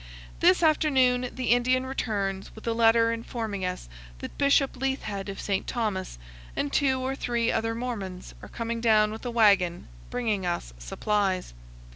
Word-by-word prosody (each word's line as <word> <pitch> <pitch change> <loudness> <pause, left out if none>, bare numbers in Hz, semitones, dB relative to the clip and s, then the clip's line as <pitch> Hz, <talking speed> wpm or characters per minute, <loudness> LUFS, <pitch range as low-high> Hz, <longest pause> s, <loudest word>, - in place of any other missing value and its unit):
This 360 0 +4
afternoon 260 -6 +3
the 255 -2 -2
Indian 255 +2 +3
returns 200 -7 -3
with 220 - -12
a 230 - 0
letter 230 0 +4
informing 225 -3 -4
us 180 - -3 0.3
that - - -8
Bishop 280 -1 +3
Leithhead 245 -7 -3
of 195 - -6
St. 195 -2 -2
Thomas 210 - -2 0.4
and 145 - -2
two 265 -2 +2
or 260 +1 -2
three 235 -3 0
other 225 0 -1
Mormons 205 -7 -5
are - - -10
coming 230 0 -4
down 215 -2 +4
with 220 - -8
a - - -1
wagon, 200 -7 +3 0.2
bringing 220 -6 -1
us 175 - -3
supplies. 190 - -1
230 Hz, 155 wpm, -27 LUFS, 195-250 Hz, 0.4 s, This